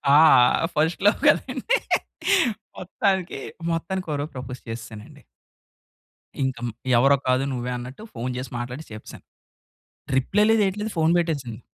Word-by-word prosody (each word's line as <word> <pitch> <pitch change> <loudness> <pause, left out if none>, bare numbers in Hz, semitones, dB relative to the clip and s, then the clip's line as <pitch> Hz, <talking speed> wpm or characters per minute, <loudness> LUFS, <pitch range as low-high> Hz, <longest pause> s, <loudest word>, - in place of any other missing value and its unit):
ఆ! - - +8 0.6
First 160 +4 +1
love 205 - +3
కదండి. 285 - +2 1.0
మొత్తానికి 190 -3 -1 0.3
మొత్తానికి 180 +3 -3
ఒక 145 - -1
రోజు 150 - -5
ప్రపోజ్ 125 0 -7
చేసేసానండి. 115 -2 -9 1.2
ఇంకం 125 -2 -2 0.3
ఎవరో 135 +3 +5
కాదు 130 +1 +2
నువ్వే 125 0 -3
అన్నట్టు 125 - -9
ఫోన్ 120 +2 -3
చేసి 130 0 -6
మాట్లాడి 125 +5 -6
చెప్పేసాను. 110 - -11 0.9
రిప్లై 200 +11 +2
లేదు 225 -1 +4
యేటిలేదు 210 +3 -2
ఫోన్ 160 +1 +3
పెట్టేసింది. 140 -9 -2
140 Hz, 125 wpm, -24 LUFS, 125-185 Hz, 1.2 s, ఆ